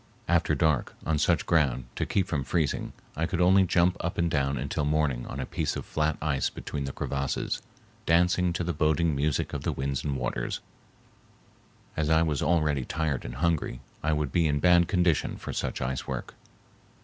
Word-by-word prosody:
After - - +2
dark, 80 -5 +1
on 80 -2 +1
such 85 +2 +2
ground, 70 -7 +2
to - - -2
keep 95 - +1
from 75 -7 -2
freezing, 80 0 -1 0.2
I 80 +2 0
could 90 +1 -2
only 95 +2 +5
jump 90 0 +3
up 85 - -3
and 85 -1 +1
down 70 -1 +1
until 70 +4 -2
morning 75 -4 0
on 70 - -6
a 65 - -2
piece - - -2
of - - -5
flat 75 0 0
ice 75 -4 +1
between 70 -2 -5
the 70 - -3
crevasses, 70 0 -2 0.5
dance 85 +2 +4 0.2
to 90 - -1
the 85 0 -1
boding 80 +1 +2
music 70 0 0
of - - -3
the - - -1
winds 70 0 -2
and 70 -2 -1
waters, - - -2 1.4
and - - 0
as 75 - -1
I 80 +1 +5
was 75 -4 0
already 75 -5 +2
tired 75 -2 -2
and - - -6
hungry 80 -4 0 0.2
I 80 - 0
would 75 -3 0
be 85 +1 +3
in 75 -1 +1
bad 85 +1 +5
condition 90 -4 +1
for - - -6
such - - -3
ice 65 +1 -3
work. - - -4
75 Hz, 195 wpm, -28 LUFS, 70-85 Hz, 1.4 s, only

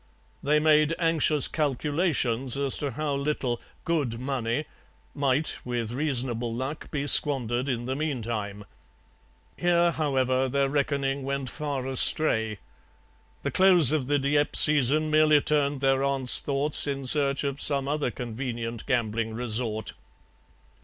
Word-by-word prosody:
They 150 +2 +1
made 155 +1 +3
anxious 160 -4 +3
calculations 140 -4 -1
as 140 -1 +2
to 145 - -3
how 145 +3 -3
little 140 -4 -2 0.2
'good 145 -9 -2
money' 130 +1 -3 0.5
might, 140 +1 -1
with 120 -2 -4
reasonable 125 -4 -1
luck, 130 +6 -6
be 145 -2 -3
squandered 130 -3 +2
in 120 -2 -3
the 130 +1 -3
meantime. 115 -8 -4 0.9
Here, 175 -1 +2
however, 130 -4 0
their 140 +1 0
reckoning 140 -1 -1
went 135 -2 -4
far 145 -4 -4
astray; 120 -4 +2 0.9
the - - -2
close 180 -7 +6
of 150 -5 -1
the 145 +1 +1
Dieppe 145 +1 0
season 150 +1 +5
merely 155 -1 +4
turned 145 -2 0
their 135 0 +1
aunt's 135 -2 +1
thoughts 145 +1 0
in 140 -1 -4
search 140 +1 +2
of 140 0 -4
some 140 -2 +1
other 145 -2 -1
convenient 120 -1 -6
gambling 115 -2 -1
resort. 115 -2 -3
140 Hz, 130 wpm, -26 LUFS, 125-150 Hz, 0.9 s, close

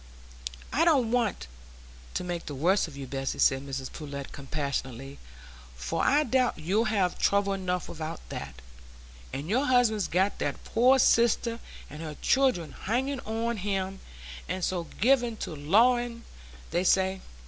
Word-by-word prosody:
"I 310 - +3
don't 275 -9 +3
want 240 -4 0 0.7
to - - -1
make 175 -1 -4
the 145 - -5
worst 180 +9 +2
of 145 -4 -11
you, 140 - -5
Bessy," 135 +1 -3
said 135 0 +3
Mrs 135 -1 -5
Pullet, 140 -3 -7
compassionately, 140 -2 -4 0.6
"for 60 +1 -2
I 295 +2 +4
doubt 255 -1 +1
you'll 190 +8 +1
have 195 -5 0
trouble 200 0 +2
enough 180 -2 -2
without 160 0 -5
that; 65 -2 -7 0.7
and 140 +3 -5
your 255 +9 +1
husband's 240 -5 +3
got 190 +3 +1
that - - -3
poor 250 +4 +4
sister 235 -1 +3 0.3
and 150 +2 -9
her 155 -2 -6
children 260 - +2
hanging 265 +6 -2
on 225 +1 -2
him,—and 185 - -5
so 175 -2 -2
given 240 -1 +3
to 160 - -5
lawing, 235 +9 +2 0.5
they 175 - +1
say. 190 0 +2
190 Hz, 145 wpm, -28 LUFS, 150-235 Hz, 0.7 s, I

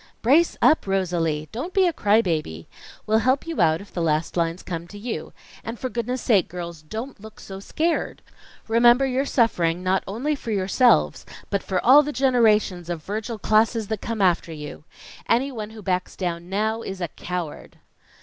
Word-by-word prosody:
"Brace 300 +9 +4
up, 310 -9 +4
Rosalie! 170 -5 -1
Don't 285 +11 -6
be 385 -1 +5
a 345 - +1
cry 215 -4 +3
baby. 155 - -3 0.4
We'll 220 +1 +3
help 260 +4 +1
you 330 - -2
out 160 0 +3
if 200 - -14
the 175 - -3
last 155 0 0
lines 170 0 -1
come 170 -1 -5
to 205 - -11
you. 225 +3 -5 0.3
And 225 +1 -6
for 255 - -4
goodness' 245 +1 -3
sake, 205 -8 +3
girls, 170 -2 -7
don't 225 - -7
look 220 0 -12
so 195 -1 -9
scared. 320 +11 -2 0.4
Remember 240 +3 +5
you're 265 +1 -1
suffering, 180 -8 +1
not 185 +1 +1
only 245 +10 -2
for 275 -5 -6
yourselves, 190 - +2 0.3
but 200 -1 0
for 185 -2 -1
all 270 +5 +8
the 295 0 -3
generations 220 - +2
of 170 -3 -4
Virgil 220 +4 -4
classes 220 0 +2
that 220 -2 -3
come 225 -3 -2
after 175 -2 +2
you. 150 -1 -8 0.4
Anyone 235 -3 0
who 220 -1 -11
backs 180 -1 -2
down 175 -1 -4
now 220 +3 -1
is 195 -4 -6
a 175 - -2
COWARD!" 175 -1 -6
210 Hz, 180 wpm, -23 LUFS, 175-240 Hz, 0.4 s, all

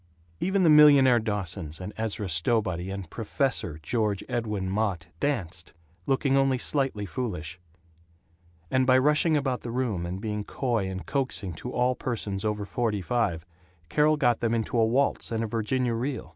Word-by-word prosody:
Even 190 +1 +1
the 165 - +5
millionaire 140 -5 +7
Dawsons 95 -7 -4
and 95 +3 -6
Ezra 110 -2 -3
Stowbody 90 0 0
and 100 -2 -5
"Professor" 115 - -2
George 105 +1 0
Edwin 110 -6 -2
Mott 95 -4 -1
danced, 95 - -3 0.3
looking 135 0 +2
only 135 -1 +3
slightly 135 -6 -1
foolish; 90 -6 -4 1.1
and 130 0 +2
by 130 0 +6
rushing 150 +4 +3
about 135 -3 -1
the 120 - -6
room 115 -8 -2
and 90 +2 -4
being 105 0 -3
coy 115 -4 -1
and 95 0 -6
coaxing 130 -9 -2
to 125 +10 -7
all 125 +1 +2
persons 105 -6 -4
over 105 -1 -1
forty 105 -2 -1
five, 90 -7 -1 0.4
Carol 150 +1 +3
got 120 -5 +2
them 115 -1 0
into 115 +1 -2
a 115 - +4
waltz 130 +1 0
and 115 0 -1
a - - -2
Virginia 115 +3 -1
Reel. 125 +2 -3
115 Hz, 160 wpm, -27 LUFS, 95-130 Hz, 1.1 s, millionaire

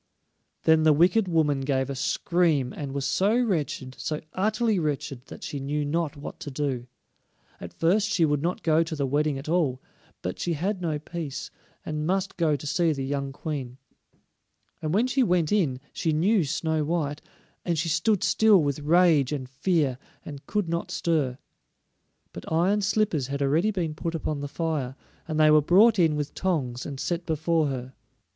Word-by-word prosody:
Then 160 0 +5
the 155 -1 +5
wicked 180 +7 +3
woman 155 -5 +1
gave 135 -1 0
a 140 - -3
scream, 155 -2 +1
and 140 -2 -5
was 140 0 -3
so 200 - +2
wretched, 150 - -1
so 155 -1 -2
utterly 215 +1 +1
wretched, 140 -4 -3
that - - -10
she 145 - -4
knew 145 +2 -2
not 155 0 -1
what 145 - -8
to - - -6
do. 130 -3 -3 0.7
At 90 - -8
first 195 +6 +1
she 170 -6 +3
would 145 -2 0
not 175 +3 -2
go 160 0 +3
to 165 -1 -2
the 140 -2 -1
wedding 145 +1 0
at 135 - -8
all, 155 -6 +1 0.4
but 90 - -4
she 175 - -1
had 185 +5 -2
no 160 -4 -1
peace, 155 -2 -6 0.3
and 155 0 -3
must 190 +1 -1
go 160 -4 +2
to 145 - -7
see 165 +3 +2
the 135 -2 -4
young 140 0 -2
Queen. 135 -4 -5 1.0
And 155 - -2
when 210 +8 +3
she 265 +1 +1
went 180 -8 +2
in 160 -12 +1
she 160 - -1
knew 180 +3 +3
Snow 160 +1 -1
white; 150 -2 -2 0.4
and 170 -2 -1
she 160 +2 0
stood 170 +6 +1
still 220 -2 +5
with 140 0 -1
rage 155 -3 +4
and 135 -4 -3
fear, 135 -1 0 0.3
and 140 -2 -9
could 210 -3 -1
not 170 +1 -2
stir. 145 -7 0 1.0
But - - -9
iron 185 +6 +2
slippers 205 - +1
had 140 +1 -2
already 160 +9 +2
been 175 -7 -2
put 165 +2 -4
upon 155 -2 -2
the 145 - -4
fire, 145 -4 -2 0.3
and 155 -1 -2
they 155 0 +6
were 155 0 +6
brought 200 +8 +5
in 160 -3 +4
with 150 -1 -3
tongs, 135 -10 -2
and 140 -3 -6
set 170 +4 -2
before 160 0 +1
her. 130 -1 -5
155 Hz, 185 wpm, -26 LUFS, 140-175 Hz, 1.0 s, they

